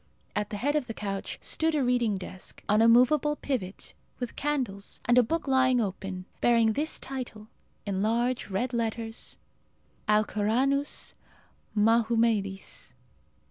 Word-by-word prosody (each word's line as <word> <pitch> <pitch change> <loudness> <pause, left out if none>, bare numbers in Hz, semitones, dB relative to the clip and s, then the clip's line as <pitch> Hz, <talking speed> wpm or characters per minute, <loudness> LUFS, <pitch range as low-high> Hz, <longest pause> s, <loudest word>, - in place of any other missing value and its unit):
At 210 0 -1
the 205 - -4
head 285 +7 0
of 290 -5 0
the 225 - -5
couch 195 -2 -4
stood 320 0 +2
a 290 - +2
reading 245 -5 +2
desk, 185 0 -9
on 210 +1 +4
a 225 - +6
movable 255 +6 +5
pivot, 220 -11 -4 0.2
with 245 -2 -5
candles, 255 -9 -2
and 240 - +4
a 250 - +8
book 315 +7 -2
lying 260 -2 +4
open, 195 -3 -3
bearing 230 -2 +4
this 305 +6 0
title, 240 -5 -7 0.4
in 195 -2 -1
large 235 +3 0
red 235 +7 -1
letters, 225 -1 -3 0.7
"Alcoranus 220 +7 +1 0.6
Mahumedis." 225 -2 +1
230 Hz, 135 wpm, -28 LUFS, 210-255 Hz, 0.7 s, a